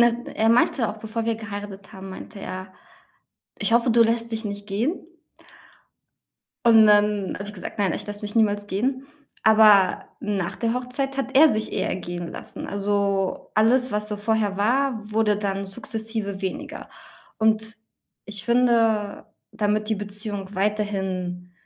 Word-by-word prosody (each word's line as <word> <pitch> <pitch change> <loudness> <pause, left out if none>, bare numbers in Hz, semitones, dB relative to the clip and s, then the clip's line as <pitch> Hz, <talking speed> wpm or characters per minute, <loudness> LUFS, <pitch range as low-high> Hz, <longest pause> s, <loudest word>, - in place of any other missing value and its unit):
ne, 235 0 +3
er 220 +1 +3
meinte 235 0 +3
auch 210 - -5
bevor 220 +1 -4
wir 230 - +1
geheiratet 205 -1 -8
haben 190 -1 -9
meinte 200 +2 -9
er: 185 0 -7 0.9
„Ich - - -1
hoffe, 235 +1 +4
du 230 0 +6
lässt 230 0 +1
dich 225 0 -2
nicht 205 -1 -5
gehen.“ 245 - -2 1.6
Und 225 -2 +7
dann 205 -2 +3
habe 200 - -6
ich 205 - -8
gesagt: 185 - -8
„Nein, 195 -4 +2
ich - - -2
lasse 205 +1 -5
mich 210 +1 -6
niemals 205 -2 +2
gehen.“ 260 +7 -1 0.4
Aber 215 -3 +6
nach 200 -4 -2
der 230 0 -1
Hochzeit 270 +2 -2
hat 270 0 -3
er 310 +1 +8
sich 215 0 0
eher - - -1
gehen 175 -1 -5
lassen. - - -7
Also 200 -1 -1
alles, 245 +4 +4
was 210 0 0
so 210 - -2
vorher 210 -1 0
war, 245 +3 +1
wurde 215 -1 +2
dann 195 -1 -2
sukzessive 220 -1 -4
weniger 190 -1 -5 0.5
und 220 0 +1 0.5
ich 205 -2 -3
finde, 230 -4 +2 0.3
damit 215 0 0
die 220 - +2
Beziehung 205 -1 -6
weiterhin 190 -3 -2
210 Hz, 150 wpm, -24 LUFS, 200-230 Hz, 1.6 s, er